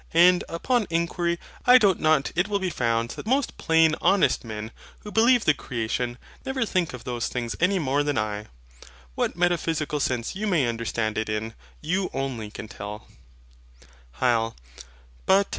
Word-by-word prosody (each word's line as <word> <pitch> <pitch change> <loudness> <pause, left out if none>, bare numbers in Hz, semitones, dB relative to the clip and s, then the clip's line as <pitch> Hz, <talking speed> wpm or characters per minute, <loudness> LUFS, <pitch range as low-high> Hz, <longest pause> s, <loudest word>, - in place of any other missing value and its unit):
And, 180 +1 +6
upon 220 +6 0
inquiry, 170 +1 0 0.3
I 250 +1 +9
doubt 200 -7 +3
not 155 -3 +2
it 180 +3 +2
will 205 -1 0
be 190 -2 -2
found 115 -3 0
that - - -8
most 265 +2 0
plain 160 -1 +4
honest 195 -1 +3
men, 110 -1 -6 0.3
who 210 - -9
believe 235 +2 +4
the 155 - +5
creation, 120 -1 -3 0.3
never 265 -2 -1
think 180 -9 -1
of 125 - -11
those 120 -2 -2
things 120 -2 -3
any 185 +3 +3
more 145 -3 +1
than 145 -1 -1
I. 105 0 -2 0.7
What - - -1
metaphysical 165 -4 0
sense 125 -1 -1
you 215 +2 -2
may 170 -9 +2
understand 115 -2 -2
it 110 - -3
in, 110 +1 -3 0.3
you 185 +5 -1
only 130 -6 -3
can 105 - -8
tell. 105 +1 -8 1.1
HYL. 115 -2 +1
150 Hz, 160 wpm, -25 LUFS, 115-180 Hz, 1.1 s, I